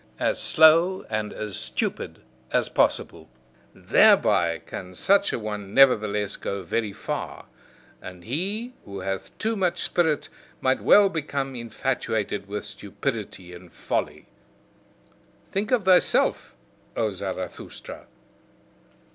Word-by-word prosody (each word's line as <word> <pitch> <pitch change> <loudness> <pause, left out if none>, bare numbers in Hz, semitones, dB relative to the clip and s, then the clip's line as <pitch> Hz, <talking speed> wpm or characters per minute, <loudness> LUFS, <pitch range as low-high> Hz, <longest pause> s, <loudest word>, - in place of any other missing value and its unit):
As - - 0
slow 165 +4 +5
and 110 -1 -2
as 105 -2 -5
stupid - - -3 0.3
as - - +1
possible: - - 0 0.5
THEREBY 85 -1 +4
can 90 0 -8
such 200 - +3
a - - -1
one 105 -3 -6
nevertheless 105 -6 +3
go 100 -1 -4
very 105 +4 -2
far. - - -5 0.6
And 90 -1 -10
he 200 - -3
who 100 -1 -8
hath 95 0 -5
too 225 +1 -1
much 185 -4 0
spirit 160 -4 +1 0.3
might 130 0 +1
well 205 -1 +6
become 140 -6 -3
infatuated 115 -3 -2
with 105 +1 -5
stupidity 100 -2 -5
and 90 0 -13
folly. - - -3 1.3
Think 205 +3 -1
of 245 -6 +1
thyself, 185 -1 +3 0.4
O - - +1
Zarathustra! - - -7
115 Hz, 115 wpm, -25 LUFS, -, 1.3 s, well